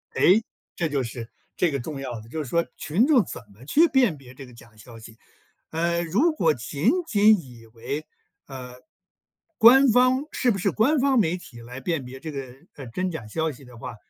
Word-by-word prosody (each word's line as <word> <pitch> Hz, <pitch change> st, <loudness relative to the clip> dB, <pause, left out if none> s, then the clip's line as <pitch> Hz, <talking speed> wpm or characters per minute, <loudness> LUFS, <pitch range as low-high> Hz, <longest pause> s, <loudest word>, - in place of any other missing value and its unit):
哎， -, -, +5 dB, 0.5 s
这 165 Hz, -2 st, -1 dB
就 140 Hz, -2 st, -1 dB
是 115 Hz, -1 st, -7 dB, 0.3 s
这 175 Hz, -, +2 dB
个 140 Hz, -, -2 dB
重 140 Hz, +2 st, -6 dB
要 125 Hz, -4 st, -6 dB
的。 110 Hz, -, -15 dB
就 155 Hz, +5 st, -4 dB
是 130 Hz, -, -8 dB
说 170 Hz, +4 st, +1 dB
群 190 Hz, -, +1 dB
众 275 Hz, -8 st, +4 dB
怎 -, -, -8 dB
么 110 Hz, +6 st, -16 dB
去 325 Hz, -, +4 dB
辨 250 Hz, -, +2 dB
别 130 Hz, -2 st, -15 dB
这 135 Hz, 0 st, -11 dB
个 125 Hz, -, -15 dB
假 115 Hz, -1 st, -17 dB
消 115 Hz, +2 st, -13 dB
息。 110 Hz, 0 st, -13 dB, 0.6 s
呃， 170 Hz, +1 st, 0 dB
如 215 Hz, -, +2 dB
果 165 Hz, -, +2 dB
仅 140 Hz, +4 st, -1 dB, 0.2 s
仅 210 Hz, -2 st, +5 dB
以 120 Hz, -4 st, -15 dB
为， 140 Hz, +7 st, -5 dB, 0.4 s
呃， 125 Hz, -2 st, -9 dB, 0.8 s
官 265 Hz, +5 st, +7 dB
方 255 Hz, +3 st, +3 dB
是 250 Hz, -, +1 dB
不 200 Hz, -, -2 dB
是 195 Hz, +1 st, 0 dB
官 275 Hz, +7 st, +2 dB
方 265 Hz, -2 st, +3 dB
媒 180 Hz, -3 st, +1 dB
体 120 Hz, -9 st, -13 dB
来 125 Hz, +2 st, -9 dB
辨 145 Hz, -1 st, -3 dB
别 130 Hz, +1 st, -10 dB
这 160 Hz, +1 st, -7 dB
个， 135 Hz, -3 st, -7 dB, 0.2 s
呃， 135 Hz, -3 st, -9 dB
真 180 Hz, +10 st, -3 dB
假 115 Hz, -10 st, -7 dB
消 160 Hz, +8 st, -2 dB
息 135 Hz, 0 st, -14 dB
的 125 Hz, -1 st, -14 dB
话， 120 Hz, +1 st, -8 dB
150 Hz, 225 characters per minute, -24 LUFS, 125-200 Hz, 0.8 s, 官